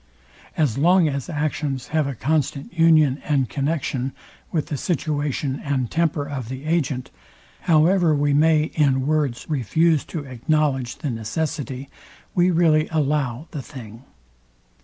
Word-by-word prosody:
As 140 -6 +1
long 175 +2 +5
as 140 -1 -3
actions 150 -3 -2
have 155 -2 +1
a 140 - -4
constant 140 +3 -1
union 155 -5 +4
and 140 -4 +1
connexion 135 +1 -2 0.4
with 155 -3 0
the 150 - -4
situation 145 -3 -2
and 135 -4 -1
temper 160 -3 0
of 130 -5 -5
the 130 +2 -6
agent, 145 -6 -1 0.6
however 165 +1 +4
we 145 0 +1
may 155 +1 +3
in 135 -4 +2
words 145 -5 0
refuse 155 +3 +2
to 160 -4 -5
acknowledge 135 -1 0
the 145 -5 -4
necessity, 135 +3 -3 0.5
we 180 0 +3
really 160 -3 +3
allow 145 -3 0
the 145 - -5
thing. 120 -4 -11
145 Hz, 135 wpm, -22 LUFS, 135-155 Hz, 0.6 s, long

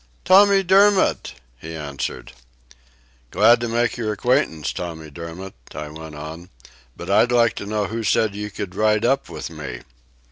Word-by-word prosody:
"Tommy 195 +1 +6
Dermott," 195 +1 +3 0.2
he 80 +1 -8
answered. 70 -5 -5 1.0
"Glad 120 - +5
to 120 - -1
make 120 +1 0
your 110 -3 -2
acquaintance, 105 - 0
Tommy 80 -3 -7
Dermott," 85 +5 -8 0.2
I 75 0 -6
went 80 0 -10
on. 80 +4 -9 0.5
"But - - -6
I'd 120 - +4
like 115 -3 +3
to 100 - -6
know 105 0 -1
who 115 +3 -4
said 110 0 +1
you 105 +1 -5
could 100 -2 -6
ride 110 0 +1
up 135 -2 +1
with 80 0 -7
me?" 70 -6 -7
100 Hz, 155 wpm, -21 LUFS, 80-120 Hz, 1.0 s, Tommy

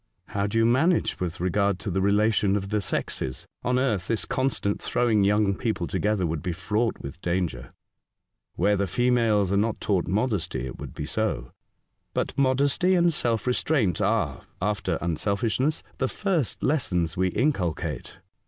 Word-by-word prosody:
" - - -47
How 100 0 +1
do 110 +2 -2
you 115 - +4
manage 160 +9 +2
with 90 -2 -3
regard 100 +2 +1
to 100 - -3
the 95 +2 0
relation 105 0 +3
of 100 -1 -2
the 105 0 0
sexes? 65 -8 -3 0.2
On 125 0 +1
earth 110 -9 0
this 115 -2 -1
constant 130 -6 -1
throwing 115 -4 +2
young 100 0 +3
people 105 -4 -2
together 105 0 0
would 80 -2 -2
be 90 - -2
fraught 105 +7 -1
with 70 +6 -8
danger." 85 -9 -2 0.4
" - - -56
Where 105 0 +2
the 100 0 0
females 115 -2 +2
are 100 - +2
not 110 +2 0
taught 95 -5 0
modesty 95 - -1
it 65 - -7
would - - -8
be 75 - -4
so; 75 - -2 0.6
but - - -1
modesty 140 +7 +3
and 170 -1 +4
self 115 -7 0
restraint 125 - +1
are, - - 0
after 105 +2 -1
unselfishness, 105 - 0 0.2
the 130 - +1
first 175 - -1
lessons 90 - +1
we 95 0 +2
inculcate. 90 - -1
105 Hz, 165 wpm, -26 LUFS, 90-125 Hz, 0.6 s, you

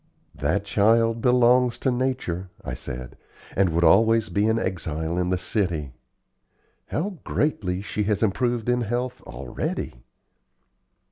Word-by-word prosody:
"That 80 +8 -1
child 115 +3 +3
belongs 125 0 +4
to 130 - 0
nature," 125 -8 -2 0.2
I - - -4
said, 60 0 -7 0.4
"and 95 -2 +3
would 85 +1 +1
always 110 +6 +5
be 100 +4 +1
an 110 0 +2
exile 80 -5 -2
in 90 0 0
the 90 - +1
city. 90 - -2 1.0
How 180 +2 -3
greatly 95 -11 -1
she 105 - -3
has 105 +1 0
improved 120 +2 0
in 125 0 +2
health 120 +2 -2
already!" - - -4
105 Hz, 130 wpm, -24 LUFS, 90-120 Hz, 1.0 s, always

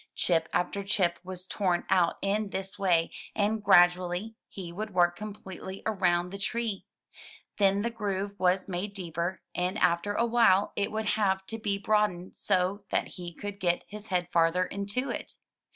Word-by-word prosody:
Chip 165 -2 +1
after 200 +3 -1
chip 190 -4 +1
was 185 0 -6
torn 185 -3 0
out 180 -3 +4
in 205 +1 0
this 190 0 -4
way, 170 -4 +2 0.2
and 210 0 +1
gradually 180 +2 +4 0.2
he 180 -3 -7
would 210 +1 -5
work 175 -1 +4
completely 195 -1 -8
around 180 -4 +1
the 200 - -6
tree. 225 -1 -2 0.7
Then 200 0 +3
the 235 - -1
groove 200 -3 -2
was 185 +1 +2
made 195 +2 -4
deeper, 175 -1 -3
and 180 +3 -1
after 180 +1 +2
awhile 230 -4 +3
it 200 - 0
would 220 0 -2
have 200 -2 +1
to 225 +3 -5
be 205 -2 0
broadened 200 -3 0
so 185 +3 0
that - - 0
he 175 -1 -7
could 205 +3 -7
get 175 -3 +1
his 210 +1 -9
head 180 -3 0
farther 170 +2 +3
into 200 +8 -3
it. - - -6
190 Hz, 165 wpm, -29 LUFS, 180-205 Hz, 0.7 s, out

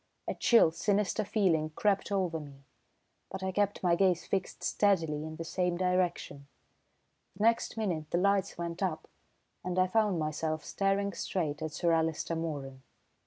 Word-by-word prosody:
A - - -1
chill, 230 -9 +5
sinister 205 +4 0
feeling 180 -7 +1
crept 205 -1 +1
over 180 -5 0
me, 140 -2 -12 0.7
but 190 0 -6
I 190 - -1
kept 205 +1 0
my 175 -2 +3
gaze 180 -2 +2
fixed 190 -2 -3
steadily 165 -6 +1
in 160 0 -6
the 165 - -5
same 180 +1 -1
direction. 180 -6 -1 0.9
The 205 - -3
next 230 0 +2
minute 170 -8 -2
the - - 0
lights 200 +1 +1
went 170 +1 -5
up, 180 -5 -2 0.6
and 180 0 -3
I 185 - +5
found 210 -1 +1
myself 155 0 -2
staring 200 0 0
straight 160 -4 -2
at 155 -1 -4
Sir 170 +2 +1
Alister 160 0 0
Moeran. 145 -5 -4
180 Hz, 160 wpm, -31 LUFS, 160-195 Hz, 0.9 s, chill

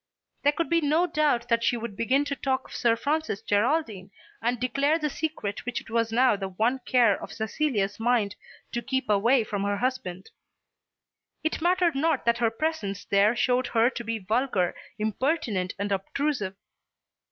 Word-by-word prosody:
There 290 - +4
could 330 +3 -2
be 335 0 +2
no 310 +4 +3
doubt 300 -8 +1
that 230 -1 +2
she 240 - +2
would 230 -3 -6
begin 260 +7 +1
to 285 -1 -2
talk 265 -1 -1
of - - -13
Sir 235 -2 +2
Francis 295 -4 -2
Geraldine 215 - 0 0.3
and 240 +1 0
declare 275 +5 +1
the 305 -3 -2
secret 300 -11 -3
which 245 - -3
it - - -14
was 230 -1 +1
now 245 0 +4
the 195 -1 -4
one 225 +8 0
care 235 -6 +4
of - - -7
Cecilia's 220 -3 -1
mind 225 -4 +1 0.4
to 240 - -2
keep 265 +2 -2
away 230 +5 +4
from 205 -2 -3
her 200 0 0
husband. 195 -7 -3 1.1
It 315 0 -1
mattered 350 0 +3
not 315 +4 0
that 235 0 +2
her 230 -1 +3
presence 225 - -3
there 200 +3 +3
showed 250 +1 +1
her 230 +2 +3
to 240 - -6
be 230 0 -2
vulgar, 215 -2 0 0.2
impertinent, 215 - -1
and 200 0 -3
obtrusive. 205 +1 -1
240 Hz, 175 wpm, -27 LUFS, 210-285 Hz, 1.1 s, There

